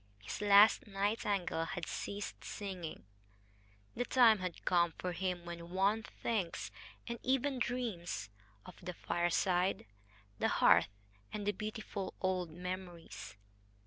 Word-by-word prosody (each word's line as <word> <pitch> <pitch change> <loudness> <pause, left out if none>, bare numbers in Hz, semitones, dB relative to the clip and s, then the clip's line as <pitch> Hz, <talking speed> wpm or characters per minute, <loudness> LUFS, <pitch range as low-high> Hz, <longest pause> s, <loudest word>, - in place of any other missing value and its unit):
His 105 - -5
last 205 +2 +7
nightingale 200 -4 0
had 175 0 -4
ceased 205 0 -5
singing. 185 - -6 0.9
The 245 - 0
time 235 -4 +6
had 180 -2 -5
come 170 -2 +3
for 180 - -2
him 180 0 -2
when 170 0 -7
one 195 +4 +2
thinks, 215 -5 -3 0.4
and 235 -1 -4
even 265 +1 +1
dreams, 220 - -2 0.3
of - - -11
the 180 0 -5
fireside, 175 +2 +1 0.5
the - - +3
hearth, - - +5 0.4
and 210 -1 -4
the 205 - +3
beautiful 215 -1 -5
old 185 -2 0
memories. 175 - -7
190 Hz, 120 wpm, -35 LUFS, 175-215 Hz, 0.9 s, last